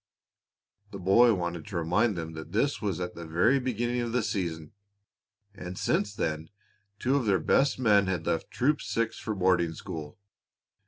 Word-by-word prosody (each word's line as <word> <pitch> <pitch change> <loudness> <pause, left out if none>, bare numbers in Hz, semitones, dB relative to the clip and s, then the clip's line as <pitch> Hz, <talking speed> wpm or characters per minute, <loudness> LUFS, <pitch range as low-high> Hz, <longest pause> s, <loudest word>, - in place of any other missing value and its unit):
The 100 - -8
boy 105 +5 +5
wanted 85 -2 -4
to 100 -4 -4
remind 90 +6 +1
them 80 -1 -5
that 80 +2 -9
this 115 0 +1
was 100 -5 -2
at 90 0 -4
the 85 - -8
very 100 +12 +3
beginning 120 -1 -1
of 120 -1 -3
the 125 -2 +1
season, 85 -7 -3 0.8
and 90 -2 -8
since 105 -1 0
then 80 -5 -2 0.5
two 130 +5 +1
of 125 -5 -1
their 100 -2 +4
best 135 +7 +2
men 105 -6 +4
had 90 -3 -2
left 80 - -1
Troop 145 +4 +1
Six 115 -1 -2
for 110 - -3
boarding 90 -3 +2
school. 75 -1 -7
100 Hz, 170 wpm, -28 LUFS, 85-115 Hz, 0.8 s, boy